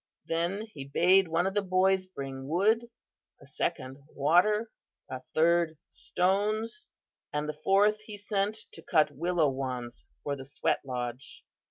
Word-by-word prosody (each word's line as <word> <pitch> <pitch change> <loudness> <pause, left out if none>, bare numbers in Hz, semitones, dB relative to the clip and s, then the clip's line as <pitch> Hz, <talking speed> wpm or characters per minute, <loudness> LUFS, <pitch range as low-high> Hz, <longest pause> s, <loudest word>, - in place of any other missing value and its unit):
Then 175 +6 -1
he 140 - -7
bade 180 +7 +4
one 165 +2 +1
of 190 - -1
the 205 - +2
boys 190 0 +2
bring 135 -6 -7
wood, 215 +9 +2 0.5
a - - -16
second 130 +2 -3 0.2
water, 195 +10 +3 0.4
a 130 -1 -6
third 165 0 +3
stones, 215 - -1 0.4
and 150 0 -2
the 150 0 -5
fourth 205 +2 +4
he 215 -1 -9
sent 205 +1 -1
to 165 - -12
cut 155 -2 +2
willow 165 +1 +1
wands 125 -3 -5 0.2
for 145 - -2
the 135 - -8
sweat 135 - -1
lodge. 125 -1 -6
175 Hz, 145 wpm, -29 LUFS, 140-200 Hz, 0.5 s, bade